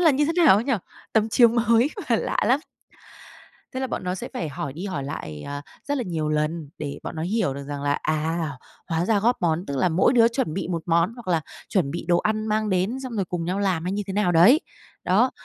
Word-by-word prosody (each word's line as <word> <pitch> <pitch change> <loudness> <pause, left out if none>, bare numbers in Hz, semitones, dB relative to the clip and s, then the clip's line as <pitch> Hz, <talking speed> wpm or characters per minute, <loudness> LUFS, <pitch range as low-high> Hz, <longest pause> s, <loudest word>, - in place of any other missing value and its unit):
là 330 -3 +6
như 290 +2 +2
thế 325 - +1
nào 250 - +9
ấy 215 - 0
nhỉ?" 270 - 0 0.4
Tấm 220 0 +3
chiếu 235 +1 +6
mới 235 +2 +3 0.2
mà 230 - +5
lạ - - -2
lắm. 265 +4 +3 1.1
Thế 260 - -3
là 265 - 0
bọn 205 - -4
nó 180 - -1
sẽ 185 - -6
phải 160 - -2
hỏi 145 -1 -5
đi 175 +7 -6
hỏi 180 -8 -3
lại, 75 - -6
à, 145 0 -5 0.3
rất 285 -1 0
là 245 - -2
nhiều 160 -3 -2
lần 150 0 -1
để 145 -2 -5
bọn 165 - -6
nó 160 - -3
hiểu 185 -6 0
được 140 - -6
rằng 145 -1 -5
là, 145 0 +1
à, 155 +1 -1 0.4
hóa 165 +1 0
ra 210 0 +2
góp 240 +4 +3
món 170 +2 +1
tức 140 - -3
là 155 - +3
mỗi 175 +9 +3
đứa 230 -2 +6
chuẩn 230 - -2
bị 195 - -3
một 170 -2 -2
món 170 +5 +2
hoặc 235 -6 -10
là 165 -3 +2 0.3
chuẩn 170 -9 +1
bị 170 - -4
đồ 175 -1 +4
ăn 215 0 -1
mang 215 0 0
đến, 190 +7 0
xong 255 -2 -6
rồi 195 - +1
cùng 175 -1 -4
nhau 185 +3 -1
làm 190 -5 0
hay 185 - -1
như 205 - -1
thế 190 - -4
nào 200 -3 +2
đấy. 200 - +7 0.4
Đó, - - +3
180 Hz, 255 wpm, -24 LUFS, 160-225 Hz, 1.1 s, nào